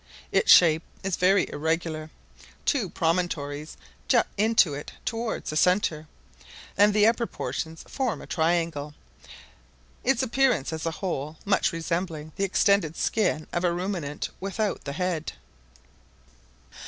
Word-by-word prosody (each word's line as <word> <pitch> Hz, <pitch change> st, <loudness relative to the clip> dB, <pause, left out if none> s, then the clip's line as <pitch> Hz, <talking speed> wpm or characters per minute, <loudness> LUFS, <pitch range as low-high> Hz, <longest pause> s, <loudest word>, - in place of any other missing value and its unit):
Its -, -, +4 dB
shape 160 Hz, -2 st, +7 dB, 0.2 s
is 190 Hz, -2 st, 0 dB
very 190 Hz, +1 st, +3 dB
irregular: 160 Hz, 0 st, -2 dB, 0.6 s
two 245 Hz, -, +1 dB
promontories 160 Hz, -4 st, -2 dB, 0.3 s
jut -, -, +4 dB
into 210 Hz, -6 st, +3 dB
it 145 Hz, +1 st, -7 dB
towards 225 Hz, -5 st, -3 dB
the -, -, -5 dB
centre, 160 Hz, -2 st, +2 dB, 0.7 s
and 205 Hz, +1 st, +5 dB
the 210 Hz, 0 st, +4 dB
upper 230 Hz, +1 st, +2 dB
portion 160 Hz, 0 st, -4 dB
forms 255 Hz, -, -3 dB
a -, -, -9 dB
triangle; 160 Hz, -3 st, -1 dB, 1.1 s
its 265 Hz, 0 st, +2 dB
appearance, 250 Hz, -, +1 dB
as 160 Hz, +1 st, -3 dB
a 165 Hz, -, -3 dB
whole, 155 Hz, -3 st, -3 dB
much 200 Hz, -, +2 dB
resembling 165 Hz, -2 st, -3 dB
the 195 Hz, -, -2 dB
extended 195 Hz, -3 st, +2 dB
skin 185 Hz, -8 st, 0 dB
of 175 Hz, -, -1 dB
a 175 Hz, -, +3 dB
ruminant 175 Hz, -5 st, -3 dB
without 200 Hz, +2 st, -2 dB
the 140 Hz, -, -4 dB
head. 170 Hz, -1 st, -2 dB
175 Hz, 130 wpm, -26 LUFS, 155-200 Hz, 1.1 s, shape